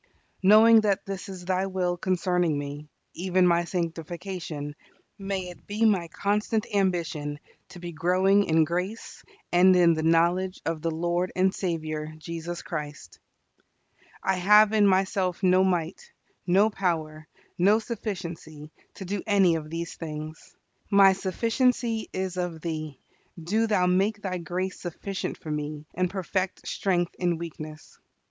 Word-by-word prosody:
Knowing 220 +3 +7
that 205 -3 0
this 195 -1 -6
is 185 -2 -8
Thy 185 +1 0
will 180 -2 -1
concerning 180 -3 0
me, 145 +1 -6 0.2
even 185 +1 +1
my 170 -1 +3
sanctification, 165 -3 -5 0.4
may 195 -2 -3
it 175 - -14
be 210 +2 0
my 190 -6 +2
constant 210 +4 -1
ambition 170 -6 -1 0.3
to 180 - -11
be 175 0 -6
growing 185 +5 +3
in 160 0 +3
grace 180 +7 -4 0.3
and 185 +1 +6
in 175 -2 +5
the 160 - -2
knowledge 170 +3 +2
of 165 -1 -2
the 165 - -1
Lord 175 +2 -1
and 190 +1 +2
Saviour 155 -3 -3
Jesus 170 +2 -6
Christ. 150 -2 -7 1.0
I 190 -1 +1
have 210 +3 +6
in 210 -2 +5
myself 190 -1 +1
no 185 0 +5
might, 180 -1 -2 0.4
no 200 +5 +4
power, 155 -5 -2 0.3
no 200 +5 +5
sufficiency, 175 -9 -6 0.2
to 190 - -8
do 195 +1 -3
any 195 -4 +4
of 155 -2 -3
these 165 +1 -4
things. 155 -1 -8 0.3
My 200 -2 +6
sufficiency 230 +4 0
is 185 -1 -3
of 175 -3 -3
Thee. 155 -4 -5 0.4
Do 215 +8 0
Thou 205 -4 +2
make 195 +4 +1
Thy 185 -2 -2
grace 180 +3 -4
sufficient 185 +2 -5
for 155 - -7
me, 150 0 -4
and 180 0 0
perfect 190 0 -3
strength 175 -3 0
in 175 -2 +1
weakness. 155 -2 -9
180 Hz, 140 wpm, -26 LUFS, 165-195 Hz, 1.0 s, Knowing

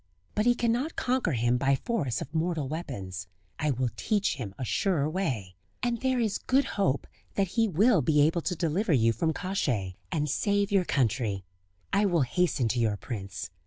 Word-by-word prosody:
But 210 +3 +1
he 240 - +5
cannot 240 +7 0
conquer 250 - 0
him 120 +1 +2
by 135 0 +3
force 135 - -2
of 150 - -7
mortal 160 -3 0
weapons. 100 - -5 0.3
I 150 - +1
will 130 -3 0
teach 210 -7 0
him 100 -7 -6
a 130 - -3
surer 160 - +1
way; 135 - -2 0.3
and 240 -1 0
there 260 -1 +1
is 220 -4 0
good 270 +2 +2
hope 185 -9 +1 0.3
that 195 -2 +1
he 225 +3 +2
will 200 +1 +4
be 150 -1 +2
able 165 +3 +3
to 180 - -2
deliver 170 +3 +1
you 115 -3 +4
from 160 +9 0
Kosciey, 125 - -2
and 150 -4 0
save 205 +7 +1
your 195 -3 +3
country. 115 -8 0 0.5
I 200 +1 +4
will 175 -5 +3
hasten 135 -2 +1
to 120 - 0
your 110 -3 +1
prince. 100 -4 -6
155 Hz, 185 wpm, -28 LUFS, 120-200 Hz, 0.5 s, he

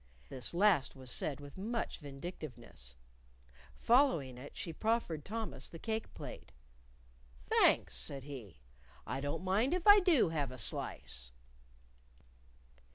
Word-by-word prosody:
This 130 +5 -4
last 180 -8 +4
was 130 -2 -5
said 145 -2 -1
with 145 +4 -10
much 230 +4 -2
vindictiveness. 135 - -8 0.8
Following 230 - +3
it, 140 - -10
she 170 -7 -4
proffered 215 -6 0
Thomas 220 +4 -4
the 165 - -9
cake 220 +5 -3
plate. - - -9 0.9
"Thanks," 60 - +4
said 130 - -4
he; 120 - -9 0.4
"I 135 - -3
don't 145 +5 -2
mind 215 - +2
if 360 - -3
I 410 0 +10
do 350 - +4
have 150 -4 -1
a 130 - -8
slice." - - -2
155 Hz, 125 wpm, -35 LUFS, 135-220 Hz, 0.9 s, I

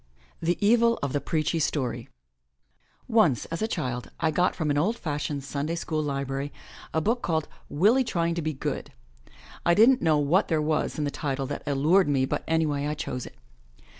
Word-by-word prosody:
THE 170 +2 +1
EVIL 235 +1 +4
OF 140 -1 -1
THE 145 - 0
PREACHY 160 +1 0
STORY 125 -6 -2 1.0
NCE, 215 - +3
as 165 - -3
a 220 - +1
child, 125 - -3
I 160 -1 +1
got 180 +4 +1
from 155 -3 -1
an 145 - +1
old 215 +9 +1
fashioned 145 -4 -3
Sunday 145 +4 -3
School 160 -2 -2
library 140 -1 -3 0.4
a 160 - +1
book 230 +9 0
called 160 -3 -1 0.2
Willie 215 - +4
Trying 170 -7 0
to 170 - -2
Be 155 0 -1
Good 135 - -4 0.3
— - - -23 0.3
I 170 - +4
don't 245 +6 +6
know 160 -3 +3
what 150 +7 +2
there 160 -2 +1
was 155 0 0
in 150 - -1
the 145 - -1
title 135 -3 -2
that 145 - -5
allured 150 +6 +3
me, 135 -2 +2
but - - -2
anyway 150 -3 +1
I 150 - -2
chose 125 -4 -4
it. - - -14
155 Hz, 195 wpm, -26 LUFS, 145-170 Hz, 1.0 s, don't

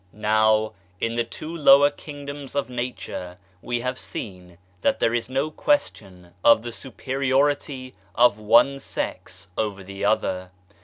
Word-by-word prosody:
Now 110 0 +2 0.3
in 115 - -1
the 120 0 +1
two 155 +7 -7
lower 145 -2 +6
kingdoms 145 -1 -9
of 140 -3 -1
Nature 120 -7 -5 0.3
we 120 -1 -2
have 125 +1 -3
seen 90 -4 -8 0.2
that - - +2
there 115 - +1
is 120 0 -1
no 135 +4 -1
question 95 - -1
of 115 -1 +6
the 120 - -5
superiority 135 +1 -1 0.2
of 120 -3 +4
one 120 +6 +4
sex 90 -7 -5
over 100 -3 -2
the 100 +1 -8
other. 95 -4 0
120 Hz, 140 wpm, -24 LUFS, 105-135 Hz, 0.3 s, lower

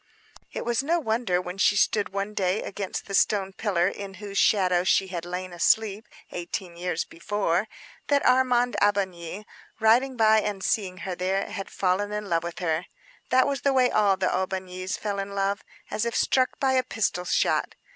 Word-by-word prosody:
It - - -5
was 240 0 +1
no 335 +5 +1
wonder, 220 - 0
when 180 +1 -6
she 205 - +4
stood 205 +1 +2
one 200 +2 -3
day 190 0 0
against 195 -1 -5
the 200 - -8
stone 195 -1 +2
pillar 185 -4 +1
in 195 0 -6
whose 200 0 -4
shadow 180 -4 +3
she 190 +1 +2
had 175 -2 -5
lain 180 +1 -5
asleep, 210 +4 +1 0.2
eighteen 175 0 -5
years 175 -1 -2
before, 190 +2 -1 0.4
that 285 -1 +2
Armand 250 -1 +3
Aubigny 195 -1 0 0.3
riding 245 +4 +3
by 220 -1 +5
and 200 -3 -3
seeing 195 -5 -1
her 190 - -2
there, 185 +2 -1
had 195 -3 -5
fallen 195 +2 0
in 210 0 -4
love 165 -2 +1
with 170 0 -6
her. 165 -1 -1 0.4
That 255 0 +4
was 275 -3 -1
the 280 - +2
way 255 -2 +3
all 200 -2 +3
the 185 - 0
Aubignys 185 0 -3
fell 205 -2 -3
in 200 0 -5
love, 195 0 0 0.3
as 215 - -1
if 235 -1 -2
struck 255 -1 +1
by 270 -1 +2
a 255 -1 +3
pistol 200 -7 -1
shot. - - +1
200 Hz, 185 wpm, -26 LUFS, 185-220 Hz, 0.4 s, by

